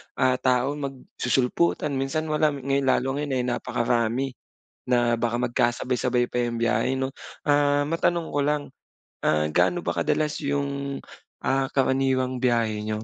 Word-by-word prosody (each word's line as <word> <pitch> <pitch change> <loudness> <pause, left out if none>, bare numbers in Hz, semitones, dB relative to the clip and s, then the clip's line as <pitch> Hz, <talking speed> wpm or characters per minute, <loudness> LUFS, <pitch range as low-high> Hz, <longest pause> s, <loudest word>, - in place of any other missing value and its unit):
ah, 130 0 +2
tao 130 +1 +2
magsusulputan. 135 +2 -1
Minsan 155 +4 -2
wala, 150 -1 +2
eh, 140 0 0
lalo 135 +1 +1
ngayon 145 -2 -2
ay 125 - 0
napakarami, 120 +1 0 0.6
na 120 -1 +3
baka 120 0 -1
magkasabay-sabay 125 0 +1
pa 125 0 -1
'yung 120 -1 -2
biyahe 115 +3 +1
'no. 135 +1 -2 0.3
Ah, 145 0 +3
matanong 165 +1 0
ko - - +2
lang, 150 0 +1 0.6
ah, 75 0 +2
gaano 130 - +2
ba - - -1
kadalas 150 -1 0
'yung, 140 -1 -2 0.4
ah, 135 0 +1
karaniwang 130 -1 +1
biyahe 115 -4 +1
niyo? 110 0 -2
130 Hz, 140 wpm, -25 LUFS, 120-140 Hz, 0.6 s, na